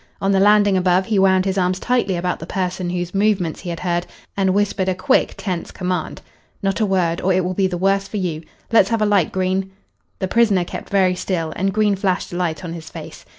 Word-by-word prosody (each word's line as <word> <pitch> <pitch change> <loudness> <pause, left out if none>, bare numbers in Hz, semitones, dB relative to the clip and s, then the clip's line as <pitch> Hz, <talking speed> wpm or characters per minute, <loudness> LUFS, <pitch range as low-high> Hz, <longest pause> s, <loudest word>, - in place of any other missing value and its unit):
On 195 - +1
the 195 - +3
landing 205 0 +5
above 185 0 +2
he 210 -1 +1
wound 190 -1 +4
his 190 0 0
arms 180 0 0
tightly 245 -6 0
about 180 +1 -2
the 165 - -8
person 185 -1 -2
whose 175 0 -3
movements 195 -5 +1
he 180 - -7
had 170 - -5
heard 175 -1 -1 0.3
and 190 -1 +2
whispered 200 -2 +1
a 185 - 0
quick, 220 +9 +1
tense 180 -4 -4
command. 180 -1 -4 0.4
"Not 195 +1 0
a 215 - +2
word, 175 -3 0
or 190 - +1
it 185 0 +2
will 185 - -1
be 190 0 +1
the 180 -1 -3
worse 195 +2 +1
for 215 - -5
you. 170 -5 -2 0.3
Let's 225 - +5
have 225 -2 +1
a - - +3
light, 200 -5 +2
Green." 190 +1 -1 0.5
The 190 - -2
prisoner 210 -4 +3
kept - - -7
very 190 -2 +3
still, 170 -3 -3
and 195 +1 0
Green 210 -1 +2
flashed 185 -2 -1
a - - -4
light 170 -3 -2
on 165 - -5
his 160 -2 -8
face. - - -10
185 Hz, 235 wpm, -20 LUFS, 180-195 Hz, 0.5 s, landing